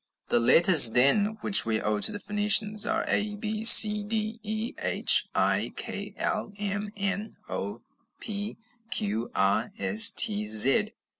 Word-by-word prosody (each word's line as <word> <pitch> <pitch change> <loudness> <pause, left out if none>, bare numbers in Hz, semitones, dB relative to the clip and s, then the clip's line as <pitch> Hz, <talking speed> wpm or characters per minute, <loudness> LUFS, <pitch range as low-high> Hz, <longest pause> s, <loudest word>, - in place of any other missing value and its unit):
The - - 0
letters, 150 0 +5
then, 205 - +1
which 200 - +5
we 110 -1 -3
owe 105 0 -4
to 105 - +1
the 205 - -9
Phoenicians, 210 +1 0
are - - -3
A, 210 0 -3
B, 215 +1 -7
C, 210 -2 +8
D, 215 +1 -5
E, 215 +2 -6
H, - - 0
I, - - -2
K, - - -9
L, - - -5
M, 205 0 -6
N, 200 +2 -6
O, 105 +4 -8 0.4
P, 210 -1 -7 0.3
Q, 110 +3 -4
R, 100 +4 -1
S, 100 +2 +3
T, 105 0 0
Z. 125 - +3
205 Hz, 150 wpm, -24 LUFS, -, 0.4 s, C